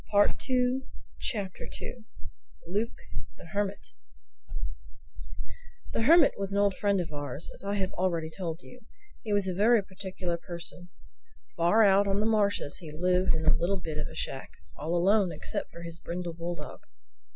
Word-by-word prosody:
THE 205 0 +5
SECOND 255 0 0 0.7
CHAPTER - - -6 1.0
LUKE 210 +6 -1 0.4
THE - - -12
HERMIT 200 -1 -2 2.1
THE - - +1
Hermit 325 +8 +7
was 195 0 -2
an 200 - 0
old 200 -1 +4
friend 200 -2 +2
of 170 -2 -3
ours, 145 +1 -4
as - - -7
I 200 +1 -1
have 190 -1 0
already 170 -3 0
told 170 -3 -4
you. 250 - -13 0.4
He 215 - -4
was 205 -2 +3
a 185 - 0
very 215 +3 +5
peculiar 185 -2 -4
person. 175 +1 -5 0.7
Far 210 +7 +5
out 200 0 +6
on 195 0 +2
the 210 - +1
marshes 205 -8 +2
he 165 - -8
lived 180 +3 +2
in 160 0 -2
a 155 - +6
little 180 +4 +1
bit 160 -3 -4
of 150 - -1
a - - -10
shack—all 145 - -4
alone 190 +1 +4
except 155 - -3
for 170 - -10
his 170 0 -7
brindle 175 0 -4
bulldog. 170 +1 -5
185 Hz, 160 wpm, -29 LUFS, 170-205 Hz, 2.1 s, Hermit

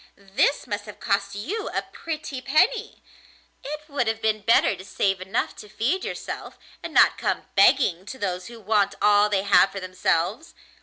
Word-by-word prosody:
This 200 +8 0
must 205 -3 -4
have 210 - -11
cost 200 -1 -1
you 390 - -4
a - - -2
pretty 305 -5 -5
penny! 360 - +1 0.6
It 300 +2 -5
would 280 -6 -1
have 225 0 -1
been 215 -1 0
better 215 -1 +3
to 185 - -11
save 195 0 -1
enough 190 +1 -2
to 210 - -11
feed 250 - -1
yourself, - - -6 0.2
and - - -6
not - - +5
come - - -1
begging 195 - +3
to 260 - -7
those 185 -5 -3
who 235 -1 -11
want 205 -1 +1
all 210 0 +4
they 195 -2 +1
have 200 -1 +5
for 195 - -6
themselves. 185 - -1
210 Hz, 175 wpm, -24 LUFS, 195-265 Hz, 0.6 s, not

